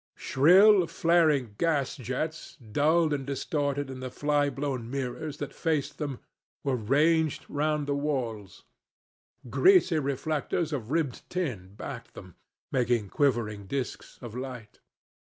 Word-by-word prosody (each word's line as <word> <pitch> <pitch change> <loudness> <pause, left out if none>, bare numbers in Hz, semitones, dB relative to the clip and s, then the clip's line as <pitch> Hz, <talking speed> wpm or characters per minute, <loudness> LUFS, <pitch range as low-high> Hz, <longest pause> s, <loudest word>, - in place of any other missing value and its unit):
Shrill 185 +6 +6
flaring 160 -8 +2
gas 150 -5 +1
jets, 140 +5 -4
dulled 150 +8 +2
and 140 -2 -2
distorted 140 0 -2
in 130 - -7
the 130 0 -5
fly 145 +2 +1
blown 135 -5 -3
mirrors 140 +3 -4
that 145 - -5
faced 150 -4 -1
them, 145 -4 -3 0.5
were 135 -2 +1
ranged 150 +7 +2
round 150 0 0
the 140 - -1
walls. 125 -9 -3 0.8
Greasy 350 - +4
reflectors 150 +3 -1
of 120 -6 -4
ribbed 150 -4 -2
tin 115 - -4
backed 120 +1 -8
them, 90 -3 -11 0.4
making 120 -5 +1
quivering 110 -8 0
disks 135 +3 -4
of 120 -3 -7
light. 125 -4 -7
140 Hz, 125 wpm, -28 LUFS, 125-155 Hz, 0.8 s, Shrill